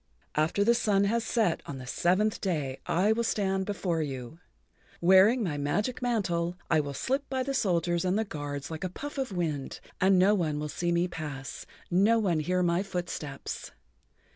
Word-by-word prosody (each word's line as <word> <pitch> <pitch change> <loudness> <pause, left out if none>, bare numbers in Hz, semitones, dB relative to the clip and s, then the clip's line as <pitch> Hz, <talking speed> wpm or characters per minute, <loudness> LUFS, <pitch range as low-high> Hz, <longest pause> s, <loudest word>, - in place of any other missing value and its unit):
"After 160 +6 +2
the 235 +3 +5
sun 210 -4 +2
has 230 +3 +1
set 225 -6 +1
on 140 - -5
the 130 - -8
seventh 185 +10 +1
day 150 -9 -2
I 190 +5 +3
will 230 +1 +1
stand 195 -4 0
before 180 -5 -1
you. 135 +1 -5 0.6
Wearing 190 +7 +6
my 150 -7 -2
magic 205 - -1
mantle, 180 -8 0 0.2
I 160 - +5
will 140 -2 -3
slip 270 - -1
by 260 -1 0
the 275 +1 -2
soldiers 175 -6 +1
and 185 +2 +1
the 220 - 0
guards 145 -4 -5
like 160 +2 -5
a 185 - -1
puff 290 +10 -6
of 265 -5 -2
wind, 160 -7 -3 0.2
and 190 0 +5
no 190 +3 +5
one 160 -7 0
will 150 0 -3
see 175 +3 -1
me 170 +1 +2
pass, 145 -6 -6 0.2
no 200 +6 +4
one 185 -8 +1
hear 180 +4 +1
my 170 +1 +2
footsteps. 175 -7 -5
180 Hz, 185 wpm, -29 LUFS, 155-210 Hz, 0.6 s, Wearing